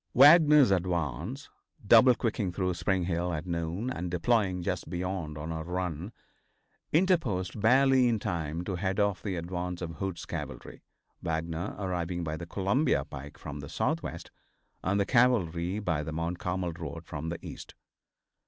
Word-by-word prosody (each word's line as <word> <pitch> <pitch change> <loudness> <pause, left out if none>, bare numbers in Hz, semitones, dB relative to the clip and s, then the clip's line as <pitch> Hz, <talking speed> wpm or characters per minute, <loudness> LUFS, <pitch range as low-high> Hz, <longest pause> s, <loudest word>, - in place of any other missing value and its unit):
Wagner's 150 - +8
advance, 90 - -2 0.3
double 120 +4 +7
quicking 110 -5 -1
through 90 0 -1
Spring 90 +2 0
Hill 85 0 -1
at 80 0 -3
noon, 85 +7 -2
and 90 -5 -3
deploying 95 0 +1
just - - -3
beyond 90 -3 -3
on 75 +2 -5
a 80 0 -3
run, 90 +1 -3 0.8
interposed 135 - +1
barely 130 +2 +5
in 115 -2 +2
time 85 -4 -3
to 90 0 -3
head 95 +2 -1
off 100 -3 +1
the 100 -3 -3
advance 90 +1 -4
of 85 -2 -6
Hood's 95 -3 -4
cavalry, - - -7 0.4
Wagner 80 +2 -3
arriving 90 -3 -2
by 80 -1 -3
the 85 +1 -7
Columbia 100 - +1
pike 70 -1 -9
from 75 0 -7
the 70 - -8
southwest - - -2 0.5
and 100 +2 +1
the 100 - +2
cavalry 95 -8 +2
by 90 -8 -1
the 75 +1 -5
Mount 85 +2 -3
Carmel 90 -1 -2
road 80 0 -7
from 80 +2 -5
the 85 - -3
east. - - -9
90 Hz, 155 wpm, -29 LUFS, 85-100 Hz, 0.8 s, Wagner's